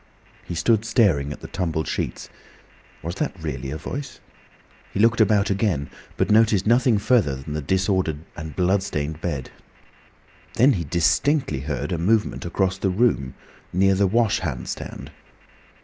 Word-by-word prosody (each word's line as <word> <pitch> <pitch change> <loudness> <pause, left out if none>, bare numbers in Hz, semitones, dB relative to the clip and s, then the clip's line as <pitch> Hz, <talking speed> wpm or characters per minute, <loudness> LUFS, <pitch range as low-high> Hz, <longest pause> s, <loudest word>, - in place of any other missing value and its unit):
He 85 - -6
stood 110 +5 +2
staring 90 - +2
at 75 - -8
the - - -7
tumbled 85 -5 -2
sheets. - - -3 0.8
Was 85 +2 -3
that 150 -9 -2
really 70 -4 -4
a 75 - -4
voice? 135 - -6 0.7
He - - -4
looked 115 +1 +4
about 105 -1 +3
again, 95 -8 0 0.3
but - - +1
noticed 110 -3 +4
nothing 120 0 +4
further 105 - +2
than 70 +3 -7
the 75 - -2
disordered 95 -1 0 0.2
and 80 -2 -7
blood 95 +2 +2
stained 80 -5 -4
bed. 75 -7 -3 1.0
Then 130 +4 +5
he 85 -6 -2
distinctly 105 - +1
heard 70 +3 -3
a 85 - -1
movement 105 +4 +1
across 95 +1 0
the 95 - +1
room, 90 - +1 0.4
near 95 +2 +3
the 100 +1 +2
wash 115 +2 +2
hand 70 -9 -4
stand. - - -7
95 Hz, 155 wpm, -23 LUFS, 80-110 Hz, 1.0 s, Then